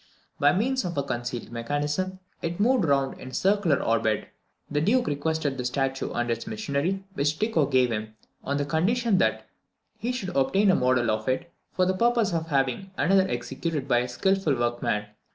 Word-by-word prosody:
By 145 +1 +5
means 255 +7 +1
of 175 -3 -4
a 140 - +1
concealed 120 -3 -4
mechanism, 145 +10 -2 0.2
it 170 +2 -3
moved 235 -1 +3
round 140 -2 +1
in - - -9
a - - -13
circular 190 -7 +2
orbit. 110 -2 +1 0.4
The 145 0 -1
Duke 245 +9 +3
requested 145 -2 -1
the - - -1
statue 135 +1 -1
and 120 0 -1
its 115 - -3
machinery, 195 -3 -2
which 150 -2 0
Tycho 210 -10 +1
gave 130 -3 +3
him, 110 0 -4 0.3
on 140 +1 -1
the 145 - 0
condition 195 +8 +1
that - - +1 0.5
he 240 - -1
should 220 -8 -4
obtain 190 +9 +3
a - - +3
model 125 -2 +2
of 110 +2 -2
it, 170 +7 -2 0.2
for 185 - +2
the 185 - +2
purpose 230 -1 +2
of 165 -1 -1
having 135 +5 0
another 190 +5 +3
executed 155 -5 -3
by 120 -3 +4
a 125 - -1
skilful 190 +4 +1
workman. 120 -3 -1
150 Hz, 185 wpm, -26 LUFS, 130-190 Hz, 0.5 s, By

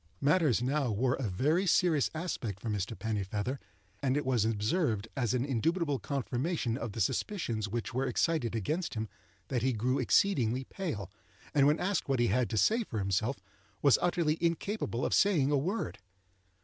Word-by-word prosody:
Matters 145 -6 +3
now 135 0 +1
wore 125 +4 +1
a 125 -6 -2
very 150 - +1
serious 160 -4 +3
aspect 125 - -3
for 110 - -3
Mr. 105 +2 -3
Pennifeather, 105 +3 -2 0.4
and 135 0 +1
it 145 - -1
was 125 -5 +2
observed, 110 - 0
as 125 -2 0
an 125 +1 0
indubitable 145 +3 0
confirmation 135 0 -2
of 115 -4 -4
the - - -5
suspicions 110 - -1
which 120 +3 -3
were 130 +2 0
excited 125 -2 0
against 155 - -2
him, 110 0 -2 0.4
that 125 - 0
he 130 +2 +1
grew 125 +4 0
exceedingly 130 - +2
pale, 130 - -5 0.4
and 140 -1 +5
when 150 +2 +3
asked 195 -5 -1
what 135 -2 +1
he 120 - +3
had 125 -2 +1
to 110 - -2
say 225 - +3
for 120 - -6
himself, 105 +6 0 0.5
was 140 -3 +6
utterly 170 -3 +1
incapable 170 - -1
of - - 0
saying 160 -9 +3
a - - +3
word. 165 - -2
130 Hz, 175 wpm, -31 LUFS, 115-160 Hz, 0.5 s, was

